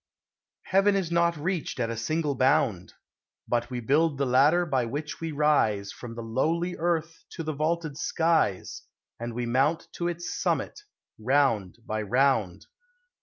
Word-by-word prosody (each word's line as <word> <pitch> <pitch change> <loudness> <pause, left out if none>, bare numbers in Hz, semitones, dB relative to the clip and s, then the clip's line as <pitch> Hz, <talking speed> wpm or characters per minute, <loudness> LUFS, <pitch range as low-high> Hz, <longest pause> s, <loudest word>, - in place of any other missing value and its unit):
Heaven 195 +2 +3
is 185 -4 -1
not 170 -1 +2
reached 165 -2 -3
at 115 -1 0
a - - -3
single 150 +6 -1
bound; 130 - +1 0.5
But 120 0 0
we 125 -1 -4
build 145 +5 +2
the 140 - +1
ladder 145 +8 +4
by 135 -6 0
which 145 +6 -5
we 165 -1 -3
rise 140 -10 +2
From 115 -2 -9
the 115 - -6
lowly 165 +10 -1
earth 165 -1 -2
to 165 - -5
the 155 0 -3
vaulted 155 0 -1
skies, 160 - 0 0.4
And 120 0 -5
we 120 0 -2
mount 135 +7 +1
to 175 - -1
its 175 +1 -4
summit, - - -1 0.4
round 115 -6 +1
by 110 0 -2
round. 110 -5 +1
145 Hz, 155 wpm, -27 LUFS, 120-165 Hz, 0.5 s, ladder